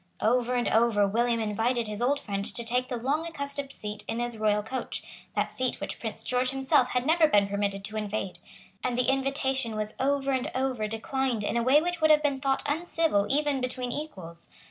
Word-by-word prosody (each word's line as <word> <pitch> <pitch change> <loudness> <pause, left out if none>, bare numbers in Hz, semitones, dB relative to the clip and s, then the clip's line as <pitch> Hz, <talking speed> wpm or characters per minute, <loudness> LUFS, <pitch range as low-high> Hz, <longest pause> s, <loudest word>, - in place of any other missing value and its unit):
Over 245 +2 +2
and 245 - +1
over 220 -3 +4
William 235 +3 +1
invited 225 +3 0
his 210 +1 -3
old 280 +4 +2
friend 200 -6 -3
to 235 - -3
take 250 +2 0
the 250 - -2
long 275 +7 0
accustomed 280 -3 -4
seat 210 -4 -6
in 225 - -2
his 240 -1 -2
royal 210 -1 +1
coach, 260 +4 -4 0.3
that - - 0
seat 255 -1 -2
which - - -5
Prince 225 -2 -5
George 250 0 +1
himself 265 -1 +2
had 250 0 0
never 320 +1 +5
been 205 -7 +4
permitted 200 -1 -1
to 215 +2 -5
invade; 200 -4 -3 0.4
and 245 -1 0
the 250 +1 +3
invitation 270 -3 0
was 215 0 -2
over 275 0 +1
and 260 -1 0
over 255 -4 0
declined 235 +1 -1
in 205 - -1
a 235 - +2
way 270 +6 +5
which 350 -1 -2
would 315 - +5
have 305 0 +6
been 280 -2 0
thought 270 0 +1
uncivil 310 -8 +1
even 285 -1 +1
between 250 0 -3
equals. 185 - -7
250 Hz, 205 wpm, -28 LUFS, 215-275 Hz, 0.4 s, have